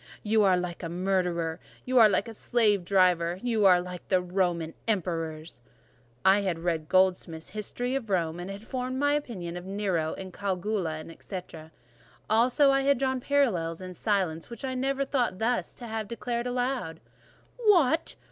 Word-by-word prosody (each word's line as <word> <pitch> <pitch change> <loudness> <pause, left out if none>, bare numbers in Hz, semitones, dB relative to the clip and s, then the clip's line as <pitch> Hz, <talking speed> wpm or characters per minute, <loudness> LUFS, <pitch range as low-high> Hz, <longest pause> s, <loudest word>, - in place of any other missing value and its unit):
"You 220 +1 +3
are 190 -3 +4
like 180 -1 -4
a 165 - -4
murderer—you 180 +5 -1
are 220 -2 +8
like 200 +2 +1
a 225 - -7
slave 210 -4 +2
driver—you 185 +4 +2
are 180 -1 +6
like 180 0 -7
the 185 - +3
Roman 175 -3 -1
emperors!" 165 - -2 0.6
I 195 +2 +6
had 185 -4 -1
read 165 -2 -2
Goldsmith's 180 -3 +1
History 245 +4 -3
of 260 -5 -3
Rome, 170 -3 0
and 180 +2 -6
had 200 +2 -8
formed 255 +1 -3
my 285 +1 +2
opinion 195 -13 -3
of 175 +1 -8
Nero, 190 -5 -1 0.2
Caligula, 185 -5 -2
&c. 190 - -5 0.9
Also 250 +5 +4
I 275 0 +3
had 280 0 +3
drawn 260 0 0
parallels 220 - +1
in 185 -1 -7
silence, 180 -4 -1
which 235 +2 -7
I 260 - -2
never 270 +2 0
thought 250 -8 0
thus 230 +4 -1
to 245 - -9
have 220 -2 -4
declared 235 +2 -3
aloud. 245 -9 -2 0.6
"What! 350 - +3
195 Hz, 155 wpm, -28 LUFS, 175-245 Hz, 0.9 s, are